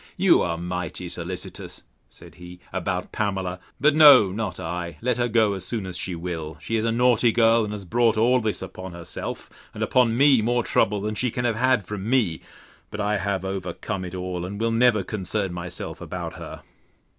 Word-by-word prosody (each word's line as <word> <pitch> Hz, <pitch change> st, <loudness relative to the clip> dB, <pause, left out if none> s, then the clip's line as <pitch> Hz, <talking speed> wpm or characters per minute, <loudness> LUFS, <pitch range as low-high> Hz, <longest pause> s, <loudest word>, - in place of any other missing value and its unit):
You 190 Hz, -1 st, +5 dB
are 85 Hz, -1 st, -1 dB
mighty 90 Hz, 0 st, -4 dB
solicitous, -, -, -6 dB, 0.3 s
said -, -, -15 dB
he, 90 Hz, 0 st, -12 dB
about 95 Hz, 0 st, -3 dB
Pamela: 95 Hz, -3 st, -2 dB, 0.2 s
But 150 Hz, +4 st, +4 dB
no, 140 Hz, -10 st, +8 dB
not 100 Hz, -2 st, -4 dB
I; 85 Hz, -1 st, -5 dB
let 125 Hz, 0 st, 0 dB
her 120 Hz, 0 st, +1 dB
go 110 Hz, -3 st, +3 dB
as 95 Hz, -2 st, -5 dB
soon 110 Hz, 0 st, -3 dB
as 90 Hz, -1 st, -6 dB
she 90 Hz, 0 st, -3 dB
will: 80 Hz, -2 st, -5 dB
She 115 Hz, -, -3 dB
is 110 Hz, 0 st, 0 dB
a 115 Hz, -, +1 dB
naughty 120 Hz, 0 st, +3 dB
girl, 115 Hz, 0 st, +4 dB
and 105 Hz, -, -4 dB
has 105 Hz, -2 st, -6 dB
brought 115 Hz, +2 st, +2 dB
all 125 Hz, +3 st, +4 dB
this 110 Hz, -4 st, -1 dB
upon 95 Hz, -1 st, -8 dB
herself; 85 Hz, -1 st, -6 dB, 0.3 s
and -, -, -2 dB
upon 120 Hz, -2 st, +2 dB
me 135 Hz, -3 st, +5 dB
more 120 Hz, +2 st, +1 dB
trouble 105 Hz, -1 st, +1 dB
than 105 Hz, +1 st, -2 dB
she 125 Hz, +4 st, 0 dB
can 125 Hz, +2 st, -3 dB
have 115 Hz, -2 st, +1 dB
had 125 Hz, -4 st, +2 dB
from 105 Hz, +1 st, -5 dB
me: 110 Hz, -11 st, +1 dB, 0.5 s
But 105 Hz, -, -7 dB
I 105 Hz, 0 st, 0 dB
have 100 Hz, -2 st, -2 dB
overcome 95 Hz, +1 st, -4 dB
it 90 Hz, 0 st, -6 dB
all, 90 Hz, -1 st, -4 dB
and 100 Hz, +3 st, -6 dB
will 115 Hz, 0 st, +1 dB
never 115 Hz, -3 st, +3 dB
concern 95 Hz, -1 st, -3 dB
myself 90 Hz, 0 st, -6 dB
about -, -, -5 dB
her. -, -, -9 dB
105 Hz, 200 wpm, -24 LUFS, 90-115 Hz, 0.5 s, no